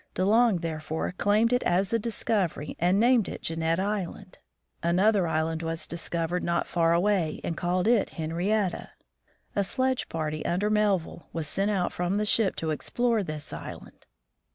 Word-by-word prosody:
De 185 - +1
Long 225 0 +4
therefore 160 -1 -3
claimed 210 +5 +2
it 245 - +3
as 190 +4 +1
a 230 - +3
discovery, 205 -8 -1
and 180 +3 +3
named 235 -2 +4
it - - -7
Jeannette 165 +1 0
island. 195 -2 -4 0.4
Another 185 +2 +3
island 160 0 -1
was 165 0 -3
discovered 170 +1 -3
not 170 0 0
far 165 -1 +1
away, 175 -2 +1
and 165 - -2
called 180 +2 0
Henrietta. 190 -2 0 0.7
A 200 - +2
sledge 260 +7 -1
party 155 -1 -3
under 200 +5 0
Melville 200 -6 0
was 165 -3 -3
sent 195 +6 0
out 190 -4 0
from 180 +3 -1
the 210 - 0
ship 210 -2 +3
to 160 -1 -2
explore 235 +8 0
this 155 -5 -6
island. - - -9
180 Hz, 155 wpm, -27 LUFS, 165-210 Hz, 0.7 s, Long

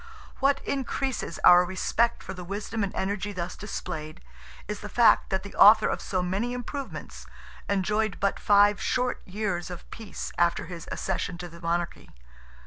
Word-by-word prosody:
What 275 +1 +2
increases 265 - -2
our 180 0 +8
respect 205 +6 0
for - - -6
the 180 -1 -8
wisdom 200 +3 -3
and 195 - -1
energy 200 +1 -2
thus 175 -2 -4
displayed, 160 -7 -6 0.5
is 210 0 -4
the 210 - -7
fact, 235 +1 +4
that 190 -1 -1
the 200 - -9
author 215 +2 +7
of - - -2
so 185 -2 -1
many 200 +7 -1
improvements, 265 +3 -6 0.4
enjoyed 210 +1 0
but 200 0 0
five 205 0 +4
short 250 -1 0
years 190 -3 -2
of 180 -2 -9
peace, 225 -2 -7
after 170 -1 +2
his 170 -1 -8
accession 180 -2 -2
to 175 0 -6
the 170 0 -13
Monarchy. 170 0 -2
200 Hz, 160 wpm, -27 LUFS, 180-220 Hz, 0.5 s, our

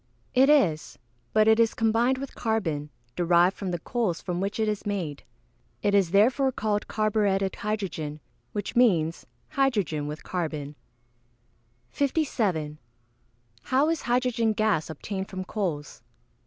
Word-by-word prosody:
_ - - -40 0.3
It 265 +2 +5
is; 185 - +2 0.3
but 215 0 +4
it 220 +1 +5
is 230 -1 +3
combined 230 +3 +2
with 275 0 -6
carbon, 165 -11 -1 0.3
derived 175 +2 +3
from 195 - -4
the 175 - -1
coals 190 -1 -1
from 180 -1 -3
which 200 +3 -2
it 220 - +1
is 210 -1 -2
made. 180 -9 -3 0.6
It 205 -1 +2
is 195 -4 +4
therefore 250 +8 +3
called 210 -3 -1
carburetted 205 -3 0
hydrogen, 180 -8 -3 0.3
which 205 -2 -4
means 175 -10 +2 0.2
hydrogen 205 - 0
with 150 +1 -6
carbon. 155 -5 -3 1.2
57. 210 - -1 0.9
_How 280 +5 +3
is 330 - -2
hydrogen 240 -2 +1
gas 215 -8 +1
obtained 190 +5 -5
from 185 -1 -5
coals? 170 -9 -4
205 Hz, 135 wpm, -26 LUFS, 170-230 Hz, 1.2 s, It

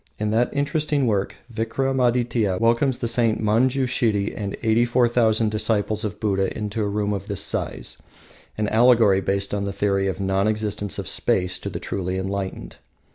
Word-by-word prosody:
In 105 0 -1
that 120 +3 +2
interesting 145 0 0
work, 100 -4 0 0.2
Vikramadytia 120 -3 0
welcomes 120 +3 +2
the 120 - -2
Saint 115 -1 +1
Manjushiri 115 -2 +1
and 100 -2 -4
eighty 110 +1 +3
four 120 0 +3
thousand 110 -2 +2
disciples 110 0 0
of 105 -1 -4
Buddha 95 -3 0
in 105 -1 -4
a 110 - 0
room 105 0 -1
of 100 0 -5
this 100 -2 -2
size, - - -3 0.6
an 105 -1 0
allegory 115 -4 +4
based 100 +1 -1
on 100 -1 -1
the 100 - -2
theory 100 0 0
of 95 - -2
the 100 - -4
non 95 +1 +1
existence 105 -2 -2
of - - -4
space 90 -1 0
to - - -5
the - - -5
truly 95 -1 -3
enlightened. 95 0 -4
110 Hz, 175 wpm, -23 LUFS, 100-120 Hz, 0.6 s, allegory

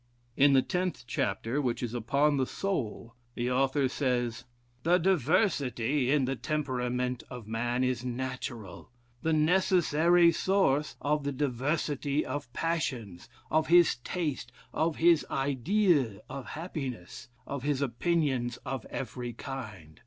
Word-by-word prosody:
In 140 0 +5
the 130 -1 +5
tenth 180 0 -2
chapter, 130 0 -1
which 125 -2 -1
is 120 -1 -3
upon 140 +5 +2
the 130 -1 +1
soul, 120 - -3 0.2
the 120 +1 -1
author 135 +2 +2
says: 125 -3 -1 0.4
"The 175 +5 +4
diversity 150 - +1
in 140 -2 +3
the 135 +1 -1
temperament 125 -4 -2
of 125 -3 -8
man, 120 +3 -1
is 125 -2 0
natural, 125 -5 -5 0.3
the 160 - 0
necessary 170 0 +4
source 155 -5 +1
of 150 0 0
the 145 - -1
diversity 145 +2 -1
of 130 -2 -5
passions, 125 - -3 0.2
of 155 0 +2
his 175 -5 +5
taste, 135 -2 -3 0.2
of 160 0 +1
his 165 -2 +4
ideas 140 - +1
of 135 - -7
happiness, 135 - -6 0.2
of 140 -2 -4
his 140 0 0
opinions 135 -2 0
of 130 -2 -4
every 125 -2 -5
kind. 105 - -8
135 Hz, 130 wpm, -29 LUFS, 120-155 Hz, 0.4 s, In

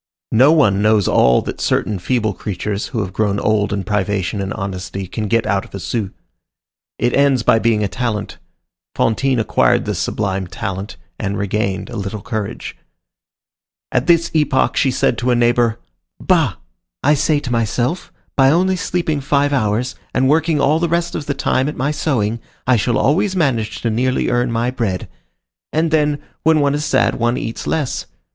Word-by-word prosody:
No 130 +6 +6
one 105 -12 +3
knows 105 -2 +3
all 60 -1 +4
that - - -6
certain 105 -3 0
feeble 110 +2 0
creatures, 100 +2 -4
who 120 -8 -2
have 95 -2 -5
grown 100 -1 0
old 110 -1 +1
in 100 -1 -2
privation 100 -1 -1
and 95 0 -3
honesty, 95 -1 -5
can 105 +4 -4
get 115 +1 +1
out 95 0 0
of - - -11
a - - -5
sou. 105 0 -2 0.9
It 120 0 0
ends 140 -3 +3
by 115 - +4
being 110 -2 +2
a - - +1
talent. 115 -3 -3 0.6
Fantine 130 +3 +1
acquired 110 - +2
this - - -2
sublime 95 -3 -2
talent, 95 +3 -5 0.2
and 100 0 -2
regained 100 -1 -2
a - - -6
little 100 0 -5
courage. 110 -3 -4 1.2
At 125 +1 0
this 170 -1 +3
epoch 150 -4 +2
she 135 - +2
said 125 -2 +1
to 125 - -1
a 125 - +4
neighbor, 120 -1 +2 0.4
"Bah! - - +2 0.5
I 145 - +5
say 150 +1 +2
to 135 -4 -6
myself, 120 - -1 0.2
by 135 -1 +5
only 185 +5 +2
sleeping 165 -4 -1
five 145 +1 +1
hours, 120 +1 0 0.2
and 130 - +3
working 155 +1 +2
all 145 +3 +3
the 170 0 0
rest 170 +1 0
of 145 - -5
the 140 - -1
time 135 0 +1
at 150 - -7
my 140 +3 0
sewing, 120 -7 -1 0.3
I 130 - +4
shall 115 +1 +1
always 170 - +2
manage 120 -11 0
to 115 - 0
nearly 125 +4 0
earn 120 0 +1
my 115 +2 0
bread. 110 -8 -2 0.6
And, 160 +1 +1
then, 150 -2 +2 0.2
when 160 -1 +3
one 140 -1 +2
is 150 +1 -1
sad, - - +1
one 120 +1 +1
eats 115 - -5
less. 150 -5 -2
120 Hz, 180 wpm, -18 LUFS, 105-145 Hz, 1.2 s, No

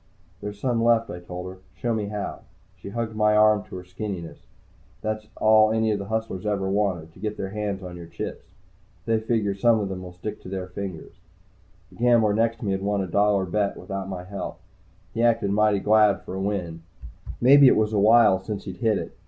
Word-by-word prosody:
"There's 105 0 -6
some 120 -1 0
left," 115 -1 +3
I 90 - -6
told 90 +1 -7
her. 95 0 -9 0.2
"Show 120 +6 -1
me 105 -2 -2
how." 105 0 -4 0.4
She 95 +1 -10
hugged 110 +1 -4
my 105 0 +3
arm 105 -1 +5
to - - -10
her 90 - -7
skinniness. 90 -2 -7 0.6
That's 110 0 -3
all 110 0 +5
any 110 0 +1
of 105 - -1
the 100 - -5
hustlers 110 -3 -3
ever 100 -2 -1
want 95 -5 -1
to - - -17
get 105 +1 -4
their 95 0 -4
hands 105 -2 -3
on 90 -1 -7
your 85 -1 -9
chips. - - -7 0.6
They 115 -1 +2
figure 110 -2 0
some 110 +3 +3
of 100 -2 -2
them 95 -1 -5
will 90 -1 -8
stick 95 +4 -7
to - - -10
their 95 -1 -4
fingers. 90 -2 -7 0.8
The - - -17
gambler 115 -3 +4
next 115 +1 +1
to - - -4
me 100 - 0
had 95 0 -1
won 100 0 0
a - - -4
dollar 100 +1 +2
bet 100 +2 -1
without 95 0 -5
my 90 -2 -5
help. 100 +2 -6 0.5
He 115 - -1
acted 115 -4 +2
mighty 105 0 +3
glad 105 0 +3
for - - -8
a 95 - -3
win 90 -5 -3 0.6
maybe 140 +3 +7
it - - +5
was 110 0 +1
a 105 - +2
while 110 -2 +6
since 100 0 -5
he'd 95 -3 -7
hit 110 0 +1
it. - - -6
105 Hz, 220 wpm, -25 LUFS, 95-110 Hz, 0.8 s, maybe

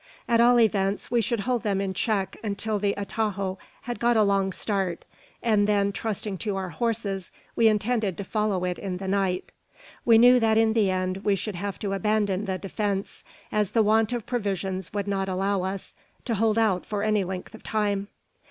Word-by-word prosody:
At 235 -1 +4
all 240 +1 +6
events, 200 -3 +1
we 240 -1 +3
should 225 0 -1
hold 245 +2 0
them 200 -2 0
in 195 -1 -2
check 195 0 -1
until 210 0 -2
the 200 0 0
atajo 200 -2 -2 0.2
had 240 -2 -5
got 240 -1 +3
a 215 - +5
long 195 -1 +2
start; 190 -3 -2 0.4
and 215 -3 +3
then, 200 -1 +2
trusting 205 -2 -3
to 205 -3 -2
our 190 -1 -3
horses, 205 -3 -2 0.3
we 230 - +5
intended 215 -3 +1
to - - -4
follow 210 -2 -1
it 180 -1 -2
in 190 -2 -4
the 190 +1 -6
night. 190 -2 0 0.5
We 230 -2 +6
knew 245 +2 +7
that 220 -1 +3
in 225 0 +4
the 215 -4 +3
end 185 0 -1
we 200 0 +1
should 210 +2 -4
have 200 +2 -4
to 200 -2 -2
abandon 205 -1 0
the 190 -2 -2
defence, 200 0 -3 0.3
as 210 -2 0
the 225 - +4
want 220 +1 +3
of 240 -3 -3
provisions 195 -6 -2
would 205 -1 -3
not 195 -1 -1
allow 195 +1 0
us 190 +1 -5 0.3
to 235 - -1
hold 220 +1 +2
out 210 -5 +2
for 205 -1 -3
any 215 -2 +2
length 185 +2 -6
of 220 - -11
time. 205 -2 -1
205 Hz, 200 wpm, -26 LUFS, 195-220 Hz, 0.5 s, knew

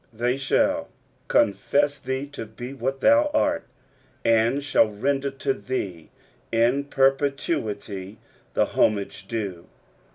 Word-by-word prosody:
They 120 +3 0
shall 135 0 +1 0.4
confess 140 +9 +2
thee 130 +1 -3
to 115 -6 -7
be 120 +4 -8
what 135 +1 -3
thou 290 +1 +5
art, 295 0 +1 0.6
and 115 +5 +3
shall 135 -6 +3
render 135 +7 -1
to 135 0 -1
lliee 100 -11 -4 0.4
in 120 +5 +2
perpetuity 135 - 0 0.4
the - - +4
homage 100 -2 0
due. 100 -7 -4
130 Hz, 110 wpm, -25 LUFS, 110-140 Hz, 0.6 s, thou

